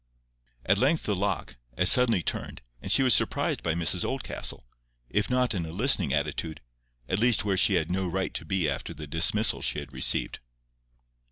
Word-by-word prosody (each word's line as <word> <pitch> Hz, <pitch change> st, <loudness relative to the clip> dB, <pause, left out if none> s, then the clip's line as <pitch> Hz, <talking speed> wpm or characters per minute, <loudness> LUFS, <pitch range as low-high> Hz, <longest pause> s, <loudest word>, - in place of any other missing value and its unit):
At 100 Hz, +2 st, +2 dB
length 145 Hz, +5 st, +1 dB
the 105 Hz, -, -2 dB
lock—as 70 Hz, -11 st, 0 dB
suddenly 115 Hz, -8 st, +4 dB
turned, -, -, -4 dB, 0.2 s
and -, -, -4 dB
she 135 Hz, -, +6 dB
was 130 Hz, -3 st, +4 dB
surprised -, -, 0 dB
by 80 Hz, -1 st, -2 dB
Mrs 85 Hz, -2 st, +2 dB
Oldcastle, -, -, -4 dB, 0.5 s
if 105 Hz, +1 st, -1 dB
not 125 Hz, -2 st, 0 dB
in 90 Hz, -4 st, -3 dB
a 80 Hz, -, -7 dB
listening 95 Hz, -, +3 dB
attitude, 75 Hz, +2 st, -3 dB, 0.5 s
at 95 Hz, -, -1 dB
least 120 Hz, -2 st, +2 dB
where 100 Hz, -2 st, 0 dB
she 95 Hz, +1 st, +3 dB
had 85 Hz, -1 st, -1 dB
no 95 Hz, 0 st, -2 dB
right 95 Hz, +2 st, -3 dB
to -, -, -4 dB
be 85 Hz, 0 st, -1 dB
after 70 Hz, -1 st, -5 dB
the 75 Hz, -, -9 dB
dismissal 85 Hz, +9 st, +2 dB
she -, -, 0 dB
had 70 Hz, -2 st, -8 dB
received. 65 Hz, -, 0 dB
95 Hz, 180 wpm, -26 LUFS, 80-105 Hz, 0.5 s, she